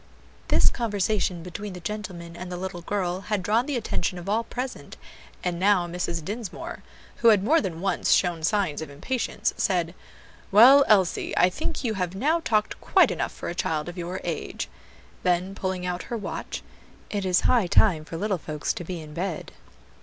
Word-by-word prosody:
This - - +4
conversation 205 -6 0
between 190 +3 -6
the 180 - -7
gentleman 175 -3 -6
and 180 +1 -7
the 180 - -3
little 185 -1 -5
girl 185 0 -2
had 210 -3 0
drawn 225 +7 +2
the 290 - -1
attention 180 -5 -2
of 175 - -8
all 220 +3 +1
present; 250 +2 -6 0.5
and 175 -1 -1
now 190 -2 +4
Mrs. 170 -2 -3
Dinsmore, 230 - -5 0.4
who 235 - +3
had 210 -4 +6
more 315 +10 +4
than 175 -5 -4
once 195 -2 0
shown 175 -3 +3
signs 165 -2 +1
of 160 - -6
impatience, 230 - -2
said, 175 -3 +1 0.6
"Well, 255 +8 +9
Elsie, 190 -5 +2
I 180 +1 +5
think 310 - -3
you 230 -3 0
have 180 -2 -2
now 305 +11 +2
talked 215 -10 0
quite - - +4
enough - - -2
for - - -7
a - - -2
child 160 -3 -1
of 175 - -6
your 180 +1 -4
age." 165 -3 -4 0.5
Then, 180 +2 +1
pulling 185 -2 -3
out 180 0 -2
her 235 - -2
watch, 210 - -5 0.5
"It 205 -2 -1
is 185 -1 +3
high 235 -7 +3
time 170 -3 +4
for 165 +1 -7
little 200 -1 -1
folks 155 -1 -2
to - - -6
be 175 0 -5
in 150 -1 -10
bed." 175 0 -4
185 Hz, 185 wpm, -26 LUFS, 175-215 Hz, 0.6 s, Well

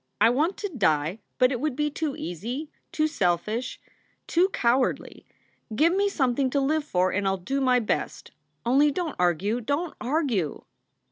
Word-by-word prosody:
I 230 - +6
want 310 +9 +1
to 410 - -3
die, 170 - +1 0.2
but 255 0 +4
it 250 - -2
would 300 -1 -1
be 295 +1 0
too 300 -1 -3
easy, 240 - -5 0.2
too 310 - +1
selfish, 215 - -1 0.5
too 360 +3 +2
cowardly. 250 -6 0 0.5
Give 330 +9 +4
me 400 +1 +2
something 265 -5 +1
to 280 - +1
live 300 +3 +1
for 185 -9 +1
and 200 0 0
I 190 - +2
ll - - -2
do 275 +6 -1
my 255 -1 +4
best. 225 - -3 0.3
Only 275 +5 +4
don 340 +3 -2
t - - -9
argue, 180 +7 +1
don 285 +8 -1
t - - -24
argue!" 245 - -1
260 Hz, 180 wpm, -26 LUFS, 210-305 Hz, 0.5 s, I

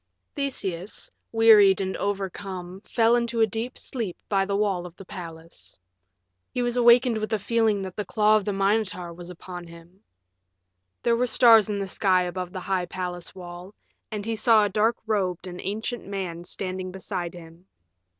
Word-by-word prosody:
VI 280 -2 0
Theseus, 190 -5 -5 0.2
wearied 215 -4 +6
and 190 -1 -2
overcome, 190 -2 -4
fell 230 0 +3
into 235 -1 -1
a 225 - +6
deep 225 +4 -4
sleep 225 -9 -4
by 195 -2 +2
the 200 - 0
wall 195 -4 0
of 170 - -15
the 195 - -12
palace. 165 - -10 0.7
He - - -3
awakened 240 -1 +4
with 215 - -4
a - - +3
feeling 220 -1 +1
that 185 -2 -7
the 210 - -2
claw 215 0 +3
of 215 - +2
the 205 - -1
Minotaur 195 -3 0
was 175 +1 -10
upon 175 0 -9
him. 170 +3 -15 1.0
There 235 -1 +3
were 250 +2 +1
stars 225 -4 +6
in 205 - -1
the 195 -1 -3
sky 185 -1 +2
above 180 0 -4
the 185 - -6
high 185 -2 -1
palace 180 -1 -5
wall, 180 +2 -10 0.3
and 210 -1 -5
he 225 0 -1
saw 220 -1 +5
a - - 0
dark 220 +3 +2
robed 190 -5 -1
and 180 -1 -7
ancient 220 +4 -4
man 180 -4 -4
standing 185 0 -4
beside 180 -2 -4
him. 165 +1 -13
195 Hz, 175 wpm, -25 LUFS, 180-220 Hz, 1.0 s, wearied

